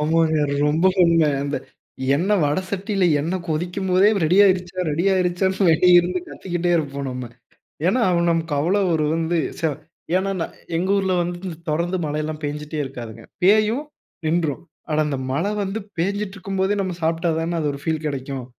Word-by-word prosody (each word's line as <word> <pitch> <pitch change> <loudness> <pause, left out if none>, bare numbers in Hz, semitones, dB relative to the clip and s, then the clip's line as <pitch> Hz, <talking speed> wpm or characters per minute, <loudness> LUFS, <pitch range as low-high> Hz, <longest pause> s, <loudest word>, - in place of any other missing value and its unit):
ஆமாங்க 160 +1 +2 0.3
ரொம்ப 155 +4 +1 0.2
உண்ம. 170 0 +4 0.2
அந்த 145 0 -2 0.6
எண்ணெய் 190 +6 +2
வட 145 +5 +1
சட்டில 200 -1 -1 0.2
எண்ணெய் 175 +4 -3
கொதிக்கும் 175 +4 -2
போதே, 185 +3 +5 0.2
ரெடியாகிடுச்சா? 185 0 +3
ரெடி 165 +5 -1
ஆகிடுச்சான்னு 190 +1 +1
வெளிய 175 +2 +6
இருந்து 180 +1 0
கத்திக்கிட்டே 175 -1 -3
இருப்போம் 140 -3 -3
நம்ம. 125 -1 -5 0.6
ஏன்னா, 240 +7 +2 0.3
நமக்கு 165 -1 -1
அவ்வளோ 190 +6 +2
ஒரு 155 -1 +1
வந்து 165 +1 0 0.2
ச - - -13 0.5
ஏன்னா 195 +1 0
நா 165 - 0 0.3
எங்க 180 +3 -1
ஊரில 195 -2 +1
வந்து 175 +2 -3 0.2
தொடர்ந்து 170 +4 0
மழைலாம் 155 +1 -3
பெஞ்சுகிட்டே 150 +1 -4
இருக்காதுங்க. 120 -5 -8 0.2
பேயும் 215 +8 +3 0.4
நின்றும். 160 -3 0 0.3
ஆனா 155 - +1
அந்த 140 -3 -2
மழை 165 +10 0
வந்து 195 +2 -2 0.2
பேஞ்சிட்டு 200 +3 -1
இருக்கும் 195 0 -5
போதே 195 +2 +2
நம்ம 185 -2 -2
சாப்பிட்டா 165 +1 +1
தானே 170 +1 -1
அது 150 - 0
ஒரு 140 - -7
ஃபீல் 160 0 -2
கிடைக்கும். 135 -2 -4
170 Hz, 160 wpm, -22 LUFS, 155-190 Hz, 0.6 s, வெளிய